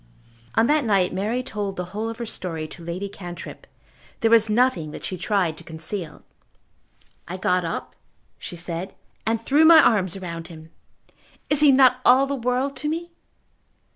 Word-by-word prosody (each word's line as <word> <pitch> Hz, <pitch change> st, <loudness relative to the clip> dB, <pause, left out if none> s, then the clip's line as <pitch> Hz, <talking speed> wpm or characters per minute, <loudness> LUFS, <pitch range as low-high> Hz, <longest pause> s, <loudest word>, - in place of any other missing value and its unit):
On 225 Hz, -, +4 dB
that 300 Hz, +2 st, +2 dB
night 195 Hz, -6 st, +2 dB
Mary 215 Hz, +7 st, -1 dB
told 205 Hz, -6 st, -4 dB
the 180 Hz, -, -4 dB
whole 220 Hz, +2 st, -3 dB
of 225 Hz, -, -7 dB
her 235 Hz, -, -4 dB
story 165 Hz, -7 st, -5 dB
to 170 Hz, -, -12 dB
Lady 175 Hz, +4 st, -4 dB
Cantrip. 175 Hz, -3 st, -9 dB, 0.5 s
There 225 Hz, -, +2 dB
was 225 Hz, -1 st, +6 dB
nothing 215 Hz, -8 st, +2 dB
that -, -, -8 dB
she 185 Hz, -, -4 dB
tried 180 Hz, -4 st, 0 dB
to -, -, -13 dB
conceal. 160 Hz, +1 st, -6 dB, 1.0 s
"I 180 Hz, +3 st, -5 dB
got 180 Hz, -1 st, +1 dB
up," 165 Hz, -, -5 dB, 0.5 s
she -, -, -7 dB
said, 175 Hz, +1 st, -6 dB, 0.3 s
"and 225 Hz, 0 st, +1 dB
threw 280 Hz, +7 st, +3 dB
my 320 Hz, 0 st, +9 dB
arms 195 Hz, -, +3 dB
round 170 Hz, -2 st, -6 dB
him. 160 Hz, -2 st, -13 dB, 0.8 s
Is 295 Hz, -, +3 dB
he 295 Hz, -1 st, +6 dB
not 260 Hz, -1 st, +5 dB
all 260 Hz, +2 st, +6 dB
the 280 Hz, -, -3 dB
world 255 Hz, +2 st, -1 dB
to 300 Hz, -, -2 dB
me?" 340 Hz, +2 st, -4 dB
205 Hz, 170 wpm, -23 LUFS, 175-255 Hz, 1.0 s, my